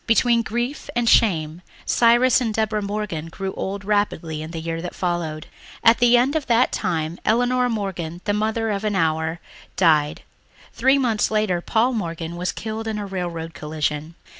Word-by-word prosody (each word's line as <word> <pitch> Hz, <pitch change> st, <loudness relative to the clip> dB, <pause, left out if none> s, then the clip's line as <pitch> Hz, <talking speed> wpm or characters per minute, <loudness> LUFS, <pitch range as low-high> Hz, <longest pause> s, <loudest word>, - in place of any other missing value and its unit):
Between 235 Hz, +1 st, +4 dB
grief 240 Hz, +6 st, -3 dB
and 240 Hz, -1 st, +1 dB
shame 165 Hz, -7 st, +3 dB, 0.2 s
Cyrus 240 Hz, +2 st, +4 dB
and 230 Hz, -3 st, 0 dB
Deborah 215 Hz, -1 st, 0 dB
Morgan 200 Hz, -6 st, -3 dB
grew 190 Hz, +3 st, -5 dB
old 195 Hz, 0 st, -4 dB
rapidly 185 Hz, -7 st, -1 dB
in 155 Hz, -, -6 dB
the 165 Hz, -1 st, -5 dB
year 165 Hz, 0 st, -4 dB
that 180 Hz, -, -6 dB
followed. 170 Hz, -4 st, -2 dB, 0.4 s
At 230 Hz, 0 st, +6 dB
the 245 Hz, 0 st, +6 dB
end 260 Hz, +5 st, +2 dB
of 310 Hz, -3 st, -1 dB
that 240 Hz, +1 st, +3 dB
time 160 Hz, -1 st, -2 dB
Elinor 245 Hz, +2 st, +2 dB
Morgan, 185 Hz, -7 st, -4 dB
the 205 Hz, -, +1 dB
mother 220 Hz, +1 st, 0 dB
of 200 Hz, 0 st, -2 dB
an 210 Hz, -1 st, 0 dB
hour, 160 Hz, -1 st, 0 dB, 0.4 s
died; 155 Hz, -5 st, +2 dB, 0.5 s
three 265 Hz, +1 st, +3 dB
months 235 Hz, -6 st, +1 dB
later 215 Hz, -5 st, 0 dB
Paul 235 Hz, +7 st, +1 dB
Morgan 170 Hz, -5 st, -4 dB
was 180 Hz, +1 st, -2 dB
killed 220 Hz, 0 st, -5 dB
in 220 Hz, -1 st, -2 dB
a 205 Hz, -, -4 dB
railroad 175 Hz, -4 st, -4 dB
collision. 150 Hz, +1 st, -3 dB
200 Hz, 170 wpm, -22 LUFS, 165-230 Hz, 0.5 s, At